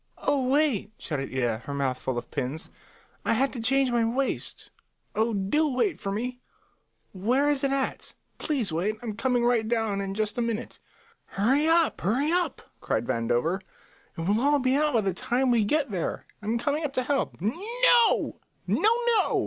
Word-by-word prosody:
"Oh, 270 -3 0
wait!" 265 -8 +1
shouted 140 -4 -4
Ida, 120 -4 0
her 140 - -3
mouth 135 -2 0
full 130 -2 -3
of 120 - -6
pins. 140 +2 -4 0.5
"I - - +1
had 265 +4 +1
to 240 - -5
change 265 +2 +3
my 235 -1 +2
waist. 255 +4 -2 0.4
Oh, 225 +2 +1
do 220 +10 +1
wait 275 +8 0
for 195 - -3
me. 250 +4 -4 0.7
Where 245 +9 +1
is 280 -2 -1
it 275 - +1
at? 275 -1 -2 0.2
Please 255 - -1
wait; 190 +7 0
I'm 220 -3 -4
coming 245 +1 +1
right 235 -2 +2
down 225 -4 0
in 195 0 -4
just 215 +2 -1
a - - +2
minute." 230 0 -3 0.5
"Hurry 265 +10 +1
up, 330 0 +3
hurry 260 - +1
up!" 350 -5 0 0.2
cried 110 - -1
Vandover. 120 +12 0 0.6
"It - - -3
will 230 - +2
be 260 -1 +1
all 300 +2 +3
out 295 - -2
by 225 - +4
the 195 -2 -1
time 245 +8 0
we 235 -3 +3
get 280 +3 0
there. 180 -4 -3 0.2
I'm 220 +3 -1
coming 290 +5 -1
up 285 -2 -2
to 255 - 0
help." 275 +1 -1
"No, 455 - +3 0.3
no, 430 - +3 0.2
no!" 465 -3 +3
240 Hz, 180 wpm, -27 LUFS, 200-280 Hz, 0.7 s, by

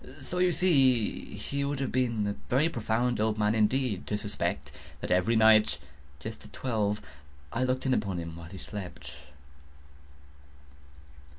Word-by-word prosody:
So 180 - -3
you 180 0 +4
see 135 - +3
he 140 0 -3
would 140 -1 -2
have 135 - -1
been 120 -4 +1
a 100 - 0 0.2
very 145 +6 +3
profound 120 -2 0
old 110 0 +1
man, 105 0 +2
indeed, 110 -1 +1
to 105 - 0
suspect 105 0 -2 0.3
that - - -5
every 90 +6 +3
night, 110 -1 +6 0.4
just - - -7
at 70 - -14
twelve, 105 - -1 0.5
I 125 - 0
looked 130 +1 0
in 130 - +3
upon 100 -6 0
him 85 -1 -5
while 85 0 -10
he 95 - -9
slept. 85 -10 -7
110 Hz, 155 wpm, -29 LUFS, 105-130 Hz, 0.5 s, night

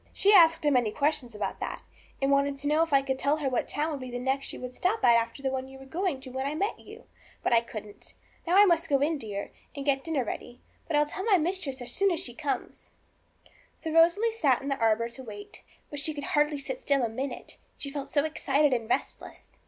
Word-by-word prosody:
She 405 +1 +4
asked 330 -4 +6
a 295 - +4
many 245 -5 +3
questions 280 -4 0
about 210 - -3
that, - - -5 0.4
and 275 0 +1
wanted 280 0 +2
to 280 +1 -4
know 305 +2 +3
if 330 -1 0
I 275 -1 +4
could 265 -1 -2
tell 285 +3 +2
her 295 -3 -2
what 255 -2 0
town 305 +2 -1
would 290 - -4
be 255 -1 -7
the 245 - -4
next 265 +2 -1
you - - -8
would 250 0 -6
stop 405 - 0
at 235 - +7
after 230 +4 -1
the 265 - 0
one 265 0 -3
you 265 0 -12
were 270 - -12
going 335 0 -2
to 260 -1 -9
when 265 +1 -2
I 295 - -2
met 400 +6 -1
you; - - -13 0.4
but - - +2
I 230 - +6
couldn't. 215 -3 -10 0.3
Now 355 +3 +4
I 410 - +9
must 335 -3 +2
go 280 - +4
in, 300 +2 +1
dear, 205 -4 -5 0.2
and 280 -1 -5
get 270 -2 +2
dinner 315 -6 0
ready; 240 +2 -6 0.3
but 325 - -1
I'll 295 0 +4
tell 370 +6 -5
my 415 -4 +5
mistress 310 -6 -2
as 245 - -4
soon 395 0 +2
as 345 -3 0
she 250 -9 -4
comes.' 285 +3 -4 0.9
So 320 - -5
Rosalie 340 +8 +4
sat 300 - +3
down - - -9
in 280 - -3
the 275 - -1
arbour 225 +1 +3
to 260 +3 -10
wait. 205 -3 -10 0.3
But 290 - -4
she 310 +1 -1
could 285 - -5
hardly 295 0 +2
sit - - -5
still 280 - +2
a - - +2
minute, 255 +3 -6 0.2
she 280 - -5
felt 280 -1 -5
so 285 0 +1
excited 290 -2 +2
and 230 -3 -2
restless. - - -3
280 Hz, 255 wpm, -28 LUFS, 260-320 Hz, 0.9 s, I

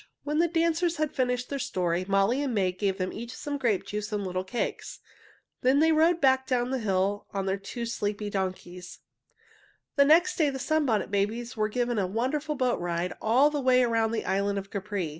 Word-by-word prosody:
When 300 +1 -1
the 340 - +4
dancers 335 +1 +1
had 310 -1 0
finished 250 -1 -1
their 280 - -3
story, 180 -5 -1
Molly 200 +7 +2
and 270 -5 -2
May 190 -3 +2
gave 190 +1 -1
them 185 -1 -3
each 235 +2 -7
some 290 -1 -4
grape 225 -7 0
juice 210 +1 -4
and 205 -2 -2
little 185 0 -2
cakes. 235 +6 -4 0.6
Then 260 +2 +3
they 320 +2 +4
rode 325 +2 +3
back 265 -2 +3
down 250 -1 0
the 265 - -1
hill 200 -1 0
on 195 -1 -1
their 195 +1 -1
two 235 +4 -5
sleepy 210 -2 -3
donkeys. 185 -2 -5 1.0
The 280 - +6
next 345 +5 +4
day 310 -3 +3
the 270 - -4
Sunbonnet 265 -9 0
Babies 220 +4 -1
were 215 -1 0
given 240 0 -1
a 190 - 0
wonderful 275 +9 -2
boat 255 -3 0
ride 175 +1 -2
all 255 +7 +4
the 295 -1 -2
way 255 -1 +4
around 225 -2 +1
the 230 - -2
island 200 +1 0
of 195 0 -6
Capri. 200 -4 -3
230 Hz, 200 wpm, -27 LUFS, 195-275 Hz, 1.0 s, The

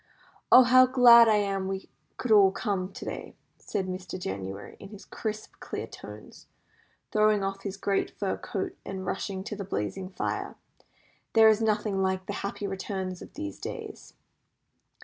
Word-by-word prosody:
"Oh, 255 - +10
how 255 +1 +6
glad 240 -2 +8
I 220 - +5
am 195 -2 0
we 190 0 -4 0.3
could 250 - -3
all 200 -3 +7
come 195 -3 -2
to - - -9
day!" - - -6 0.2
said 200 -3 -3
Mr. 185 0 -6
January, 95 - -6
in 195 - -10
his 205 -1 -12
crisp, 215 -1 -5
clear - - -5
tones, - - -12 0.6
throwing 215 -1 +3
off 195 0 -3
his 195 -1 -5
great 200 0 0
fur 195 -2 -1
coat, 190 - -4
and 190 -1 -6
rushing 190 0 -3
to 210 - -5
the 200 - -5
blazing 185 - -4
fire. 190 - -3 0.8
"There 225 -1 +7
is 220 0 +3
nothing 210 -2 0
like 190 0 0
the 205 - -4
happy 200 +1 -4
returns 190 -1 -4
of - - -12
these 100 -1 -6
days." - - -8
195 Hz, 165 wpm, -28 LUFS, 190-215 Hz, 0.8 s, Oh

